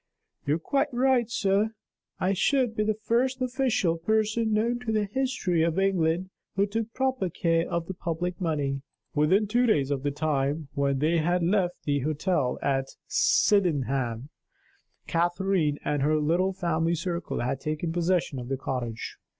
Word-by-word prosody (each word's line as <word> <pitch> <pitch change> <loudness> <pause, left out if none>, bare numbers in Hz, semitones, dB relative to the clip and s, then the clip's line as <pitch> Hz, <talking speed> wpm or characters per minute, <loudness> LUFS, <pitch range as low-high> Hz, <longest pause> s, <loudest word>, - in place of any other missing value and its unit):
"You 145 - +3
are - - -3
quite 280 - 0
right, 250 -2 +2
sir; 210 0 +1 0.4
I 190 +2 +1
should 245 +3 +1
be 215 - +1
the 215 0 +1
first 240 +5 0
official 245 -10 0
person 220 +4 +1
known 230 +3 +1
to 245 -2 -3
the 215 -1 +1
history 210 -7 0
of 165 +1 +1
England 185 -2 +1 0.2
who 195 +1 +3
took 225 +2 -3
proper 260 -7 0
care 165 -1 0
of 170 -1 -1
the 190 - -5
public 175 +1 -3
money." 145 -5 -1 0.3
Within 175 +8 +3
two 240 +4 +2
days 145 - +2
of 140 -2 -1
the 145 - 0
time 145 0 -1
when 140 -1 +1
they 160 +4 +2
had 175 +2 +1
left 180 0 0
the 145 -1 +1
hotel 150 -1 0
at 135 -1 +1 0.2
Sydenham, 135 - +2 0.8
Catherine 175 -2 +1
and 145 -1 0
her 150 +3 +2
little 170 +5 +2
family 170 -3 0
circle 170 +1 -3
had 125 +2 -1
taken 155 +3 -2
possession 175 -5 0
of 120 - -7
the 135 +1 -2
cottage. 125 -4 -4
175 Hz, 160 wpm, -27 LUFS, 150-215 Hz, 0.8 s, You